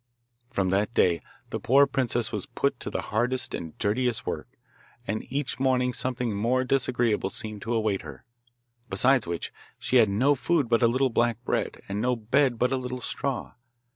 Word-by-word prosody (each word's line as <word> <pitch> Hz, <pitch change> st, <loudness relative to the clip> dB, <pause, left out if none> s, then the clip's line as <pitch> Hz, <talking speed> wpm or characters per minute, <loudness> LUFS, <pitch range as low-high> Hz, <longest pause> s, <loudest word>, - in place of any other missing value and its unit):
From 95 Hz, -7 st, 0 dB
that 105 Hz, +4 st, 0 dB
day 85 Hz, -3 st, +3 dB, 0.3 s
the -, -, -2 dB
poor 140 Hz, +3 st, +5 dB
princess 120 Hz, -4 st, -1 dB
was 105 Hz, -3 st, -4 dB
put 140 Hz, -3 st, -1 dB
to -, -, -4 dB
the -, -, -2 dB
hardest 125 Hz, +4 st, +1 dB
and 80 Hz, -2 st, -6 dB
dirtiest 115 Hz, +3 st, 0 dB
work, -, -, -4 dB, 0.6 s
and 110 Hz, +1 st, -4 dB
each 140 Hz, -1 st, -2 dB
morning 125 Hz, -1 st, +2 dB
something 125 Hz, -4 st, -2 dB
more 120 Hz, +5 st, +1 dB
disagreeable 120 Hz, -6 st, +1 dB
seemed 105 Hz, +1 st, -4 dB
to 120 Hz, +1 st, -2 dB
await 110 Hz, -3 st, 0 dB
her. -, -, -11 dB, 0.6 s
Besides 130 Hz, -5 st, +4 dB
which, 85 Hz, -1 st, -4 dB, 0.2 s
she 130 Hz, -, +1 dB
had 110 Hz, -4 st, +6 dB
no 125 Hz, +9 st, +3 dB
food 145 Hz, 0 st, +1 dB
but 115 Hz, 0 st, +3 dB
a 120 Hz, -, +6 dB
little 130 Hz, +2 st, +1 dB
black 120 Hz, -1 st, +2 dB
bread, -, -, -2 dB
and 100 Hz, +1 st, -2 dB
no 125 Hz, +1 st, +1 dB
bed 120 Hz, +3 st, +1 dB
but 125 Hz, +3 st, +1 dB
a 135 Hz, -, +1 dB
little 125 Hz, 0 st, -4 dB
straw. 135 Hz, +2 st, -3 dB
120 Hz, 180 wpm, -27 LUFS, 110-130 Hz, 0.6 s, had